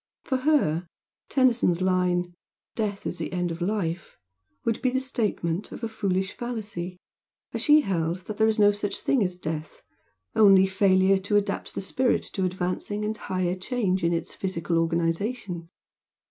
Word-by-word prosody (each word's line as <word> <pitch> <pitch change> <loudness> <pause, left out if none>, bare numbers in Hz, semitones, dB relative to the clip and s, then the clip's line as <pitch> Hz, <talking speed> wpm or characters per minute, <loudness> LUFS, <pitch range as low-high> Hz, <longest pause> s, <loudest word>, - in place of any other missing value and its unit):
For 260 - 0
her 255 - +2 0.4
Tennyson's 240 -10 +3
line 180 -1 +1 0.4
"Death 210 -3 -3
is - - -3
the - - -3
end 180 -1 -1
of 165 +1 -6
life" 175 -3 -2 0.5
would 230 0 0
be 255 - +2
the 260 +1 0
statement 210 -8 -2
of - - -9
a - - +1
foolish 190 -3 -1
fallacy, 210 -7 -5 0.6
as - - -2
she 300 0 +6
held 180 - -2
that 215 - -6
there 220 - +4
is 220 - +1
no 205 -1 +6
such 205 0 -3
thing 260 -6 +2
as 180 -1 -2
death, 155 -3 -6 0.5
only 195 -3 +7
failure 190 0 +3
to 200 +2 +1
adapt 205 - -2
the - - -2
spirit 245 +6 +1
to 190 - 0
advancing 185 +3 -2
and 215 +1 -1
higher 185 -4 -1
change 190 -1 -1
in 170 - +3
its 170 -1 -2
physical 170 -3 -1
organisation. 170 +2 -1
190 Hz, 160 wpm, -26 LUFS, 175-220 Hz, 0.6 s, only